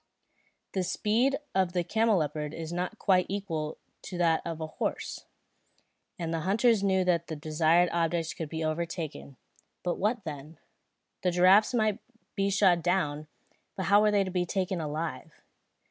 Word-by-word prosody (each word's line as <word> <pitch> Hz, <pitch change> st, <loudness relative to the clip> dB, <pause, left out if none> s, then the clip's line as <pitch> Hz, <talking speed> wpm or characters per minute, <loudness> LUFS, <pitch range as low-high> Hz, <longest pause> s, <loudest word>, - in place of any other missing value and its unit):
The 190 Hz, -, -1 dB
speed 230 Hz, +9 st, +1 dB, 0.2 s
of 185 Hz, -2 st, +1 dB
the 175 Hz, -1 st, +1 dB
camelopard 160 Hz, -8 st, 0 dB
is 165 Hz, 0 st, -6 dB
not 180 Hz, +5 st, -3 dB
quite 185 Hz, -3 st, +3 dB
equal 165 Hz, -6 st, -3 dB, 0.2 s
to 185 Hz, -, -7 dB
that 165 Hz, -2 st, +2 dB
of 165 Hz, -1 st, -5 dB
a 160 Hz, -, -3 dB
horse, 155 Hz, -, -4 dB, 0.9 s
and 165 Hz, -1 st, -3 dB
the 165 Hz, -, 0 dB
hunters 210 Hz, +5 st, +3 dB
knew 190 Hz, -1 st, +2 dB
that 170 Hz, -2 st, +1 dB
the 160 Hz, -, -4 dB
desired 160 Hz, +3 st, +3 dB
objects 165 Hz, -1 st, 0 dB
could 160 Hz, -2 st, -6 dB
be 160 Hz, +1 st, -3 dB
overtaken; 155 Hz, -3 st, -4 dB, 0.5 s
but 175 Hz, -, -2 dB
what 215 Hz, +2 st, 0 dB
then? 150 Hz, 0 st, -8 dB, 0.6 s
The 180 Hz, -, +2 dB
giraffes 185 Hz, +6 st, +5 dB
might 215 Hz, -2 st, +1 dB, 0.4 s
be 195 Hz, -1 st, +1 dB
shot 190 Hz, -3 st, +4 dB
down, 155 Hz, -4 st, 0 dB, 0.5 s
but 190 Hz, -, -3 dB
how 205 Hz, -, +8 dB
were 215 Hz, -, +4 dB
they 205 Hz, -1 st, +3 dB
to 185 Hz, -, -5 dB
be 180 Hz, -1 st, +1 dB
taken 185 Hz, -1 st, -2 dB
alive? 155 Hz, +1 st, -5 dB
175 Hz, 160 wpm, -29 LUFS, 160-195 Hz, 0.9 s, how